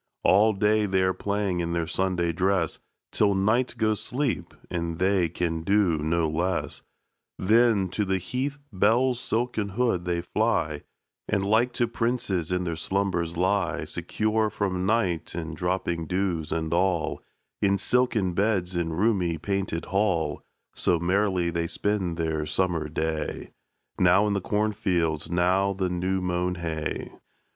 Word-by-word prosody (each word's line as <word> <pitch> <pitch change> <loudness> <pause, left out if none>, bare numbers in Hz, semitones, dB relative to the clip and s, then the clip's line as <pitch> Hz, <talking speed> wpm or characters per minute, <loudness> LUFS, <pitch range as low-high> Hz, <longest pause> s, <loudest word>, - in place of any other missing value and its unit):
All 105 +3 +5
day 105 +1 +2
they're 95 -1 +2
playing 100 -3 -1
in 85 0 -1
their 85 -1 0
Sunday 90 0 0
dress 90 -1 0 0.3
Till 100 -2 +2
night 110 +7 +1
goes 110 -2 +1
sleep, 130 0 -2 0.2
and 85 -1 -2
they 95 -1 +2
can 85 -1 -2
do 95 -3 +2
no 80 +2 +1
less; 85 +3 -2 0.6
Then, 110 -1 +3
to 105 +4 -1
the 95 -1 0
heath 130 +10 -3 0.2
bell's 115 +6 +3
silken 115 -4 -1
hood 100 -4 0
they 85 -1 0
fly, 85 -6 0 0.5
And 100 -2 +1
like 110 +5 +3
to 120 -1 +1
princes 115 -8 -1
in 90 0 0
their 85 -2 -2
slumbers 85 -1 -1
lie, 95 +3 +1
Secure 110 0 0
from 95 -3 -2
night, 95 -8 0
and 80 -2 -4
dropping 85 -1 -2
dews, 90 -4 -1
and 80 0 -1
all, 85 -2 +1 0.4
In 100 -1 +3
silken 115 -5 +1
beds 95 -2 0
and 80 -2 -1
roomy 95 -5 +1
painted 95 -1 -2
hall. 90 -7 0 0.3
So 85 - +2
merrily 90 -1 +1
they 85 0 -1
spend 95 -3 -1
their 80 -2 -1
summer 85 -5 0
day, 80 +1 -3 0.5
Now 90 +3 +5
in 105 - +1
the 100 - -1
cornfields, 95 -7 0
now 90 +3 +2
the 95 -1 -1
new 95 +2 -1
mown 90 0 -1
hay. 80 -3 -4
95 Hz, 145 wpm, -26 LUFS, 85-105 Hz, 0.6 s, All